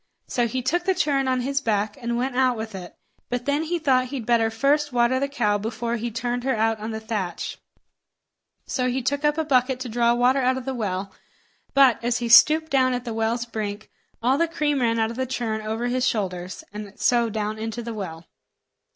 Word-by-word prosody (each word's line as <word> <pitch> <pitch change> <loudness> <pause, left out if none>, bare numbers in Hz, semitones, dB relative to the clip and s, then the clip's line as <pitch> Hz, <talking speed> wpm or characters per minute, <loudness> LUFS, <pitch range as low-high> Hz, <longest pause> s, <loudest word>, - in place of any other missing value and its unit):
So 240 -1 0
he 255 +2 -3
took 350 +7 0
the 380 -1 +2
churn 275 -4 +1
on 255 -1 +1
his 275 +2 -1
back, 210 -3 0
and 235 0 -1
went 255 +1 -2
out 255 -2 +2
with 220 0 -5
it; 180 -2 -8 0.3
but 245 0 -3
then 285 +1 +1
he 335 +2 -1
thought 260 -5 +2
he'd 255 -3 -5
better 230 -1 +3
first 280 +6 +1
water 245 +1 +2
the 280 - 0
cow 215 -7 0
before 230 +2 -3
he 235 +1 -3
turned 240 +2 -3
her 265 -1 +1
out 225 0 +1
on 215 +1 -5
the 220 -1 -4
thatch; 210 -6 -4 1.1
so 255 -1 -1
he 255 +1 -2
took 285 +3 -1
up 295 +1 +2
a 320 - 0
bucket 255 -2 +2
to 255 - -4
draw 235 +1 +2
water 250 +3 +3
out 255 +1 +2
of 260 - -6
the 265 - -2
well; 195 -4 -3 0.6
but, 265 -4 +5
as 240 0 +1
he 240 -1 -3
stooped 310 +6 +7
down 255 -2 +3
at 250 0 -5
the 230 - -4
well's 225 +2 -1
brink, 215 -2 -5 0.3
all 260 +4 +3
the 335 - +3
cream 300 -3 0
ran 230 -1 +2
out 225 0 +1
of 230 - -8
the 260 0 -1
churn 230 -4 -2
over 220 +2 -3
his 250 +1 +1
shoulders, 185 -4 -3
and 210 -1 -8
so 235 -2 +3
down 215 0 -3
into 225 +1 -4
the 230 0 -5
well. 170 -6 -6
240 Hz, 220 wpm, -24 LUFS, 220-260 Hz, 1.1 s, stooped